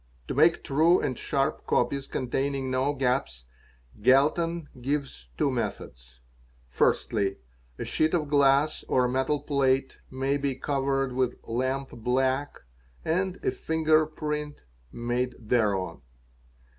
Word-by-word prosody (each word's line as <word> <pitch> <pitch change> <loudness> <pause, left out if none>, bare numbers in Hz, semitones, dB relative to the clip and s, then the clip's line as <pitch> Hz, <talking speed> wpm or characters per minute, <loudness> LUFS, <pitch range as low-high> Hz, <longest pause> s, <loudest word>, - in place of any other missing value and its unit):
To - - -1
make - - +4
true 160 +6 +4
and 130 - -1
sharp 140 +5 -1
copies 140 -1 0
ontaining 135 +1 -1
no 130 +2 +1
gaps 125 - -1 0.6
Galton 155 +6 +3
gives 135 - -3
two - - +2
methods. - - -5 0.5
Firstly, 100 - +1 0.4
a - - -4
sheet 155 +2 +1
of 155 -4 0
glass 145 +1 +3
'a 125 -1 +3
metal 130 +3 0
plate 135 -2 +1
may 135 +2 -1
be 140 -2 -1
covered 135 -1 -1
with 130 -1 0
lamp 130 +3 -2
black 130 +4 -1 0.4
and 185 +3 0
a - - +3
finger 155 -1 +2
print 150 -1 -4 0.3
made 120 +1 -2
hereon. 105 -6 0
135 Hz, 120 wpm, -27 LUFS, 125-150 Hz, 0.6 s, make